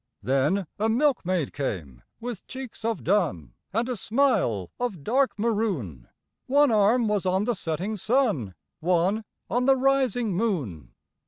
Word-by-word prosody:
Then 140 +9 +1
a 220 +2 +2
milkmaid 220 - +1
came 85 - -4 0.2
with 235 -4 -6
cheeks 260 -4 -8
of 230 0 -1
dun 150 - 0 0.2
And 230 +4 0
a 250 - -2
smile 210 - +1
of 220 - -3
dark 240 - +1
maroon, 200 - -1 0.4
One 285 0 +4
arm 220 +3 +4
was 205 -3 0
on 190 +2 +2
the 240 +2 +1
setting 185 +3 -3
sun, 205 - +1 0.2
One 180 +6 +1 0.2
on 245 +1 0
the 270 0 +6
rising 260 -5 +2
moon. 140 - -2
210 Hz, 140 wpm, -26 LUFS, 155-240 Hz, 0.4 s, the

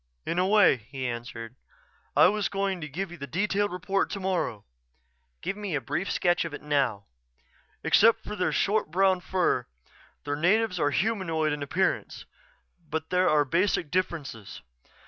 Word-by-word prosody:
"In 170 - -1
a 185 - +2
way," 205 -8 +5
he 130 +4 -7
answered. 120 -1 -6 0.6
"I - - +8
was 210 -1 0
going 195 -2 -2
to 150 - -4
give 180 +5 -4
you 175 - -9
the 140 - -6
detailed 205 +6 0
report 195 +2 -1
tomorrow." 185 - -2 0.8
"Give - - -3
me 205 -5 -4
a - - +1
brief 135 - -3
sketch 175 -1 +2
of 165 -3 -5
it - - -11
now." 135 -9 0 0.8
"Except 230 +2 +5
for 210 - -6
their 185 - 0
short 210 -4 +1
brown 190 +2 +3
fur, 180 -9 0 0.6
the 145 0 -2
natives 185 +4 +2
are 145 - +2
humanoid 165 -5 0
in 150 - -4
appearance. 180 +7 -1 0.6
But 160 +1 -4
there 185 0 +3
are 150 -1 +3
basic 170 0 +1
differences. 150 - -3
175 Hz, 160 wpm, -27 LUFS, 145-195 Hz, 0.8 s, I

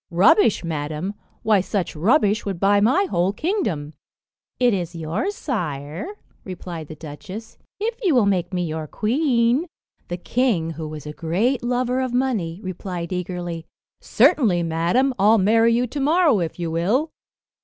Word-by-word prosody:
"Rubbish, 205 - +4
madam! 155 +3 -3 0.3
Why, 210 -3 +4
such 190 -2 -2
rubbish 210 - +2
would 195 -4 -4
buy 200 +2 +4
my 260 - +4
whole 185 - +1
kingdom." 205 - -2 0.7
"It 245 -2 +4
is 175 -3 -3
yours, 170 - -2
sire," 160 - -4 0.4
replied 175 -4 -7
the 155 - -8
duchess, 185 +9 -9 0.2
"if 455 +3 -2
you 365 - +2
will 240 -4 +4
make 190 -3 0
me 180 -2 -1
your 155 -1 -4
queen." 245 - +1 0.4
The 175 - -4
king, 190 -5 0
who 160 0 -6
was 150 -1 -8
a 150 - -6
great 195 - 0
lover 250 +1 0
of 255 -2 -2
money, 215 -10 -1
replied 180 -1 -5
eagerly, 175 -2 -4 0.3
"Certainly, 210 - +3
madam, 170 +12 +1
I'll 215 +3 +5
marry 225 +3 +4
you 240 +2 +2
to 285 +4 -5
morrow 305 - +3
if 165 -2 -3
you 170 -2 -3
will." 215 - +1
195 Hz, 155 wpm, -22 LUFS, 170-250 Hz, 0.7 s, I'll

